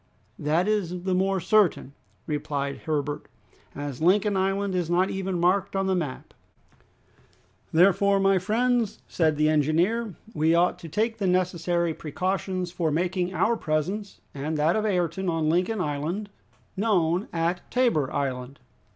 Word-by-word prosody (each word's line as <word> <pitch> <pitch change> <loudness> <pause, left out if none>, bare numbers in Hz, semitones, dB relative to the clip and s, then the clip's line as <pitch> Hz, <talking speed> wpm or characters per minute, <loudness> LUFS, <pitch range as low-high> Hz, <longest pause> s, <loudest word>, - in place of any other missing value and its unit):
"That 160 +5 +1
is 180 -4 -1
the 190 0 0
more 190 +1 +1
certain," 185 -7 +2 0.3
replied 145 -2 -3
Herbert, 145 -1 -2 0.5
"as 145 -2 -5
Lincoln 200 +4 +3
Island 195 +1 0
is 175 -3 -1
not 180 +2 +2
even 190 -2 -2
marked 190 +3 +1
on 195 0 +1
the 190 - +1
map." 155 -8 -4 1.4
"Therefore, 195 +3 +4
my 195 -1 +3
friends," 230 +3 +1
said 160 -3 +1
the 155 0 +3
engineer, 170 +8 +1 0.2
"we 160 0 +2
ought 175 +1 +2
to 165 - -9
take 225 +6 -1
the 195 - 0
necessary 175 -2 +1
precautions 185 +3 -3
for 170 -3 -1
making 180 +3 -1
our 235 +5 +2
presence 185 +5 -3
and 150 +3 -3
that 155 +3 +2
of 215 0 0
Ayrton 180 -1 0
on 165 -2 0
Lincoln 180 +6 +1
Island 170 +6 -3 0.4
known 190 -3 +1
at 170 +2 -1
Tabor 235 - +1
Island." 130 -1 -3
180 Hz, 140 wpm, -26 LUFS, 155-195 Hz, 1.4 s, Therefore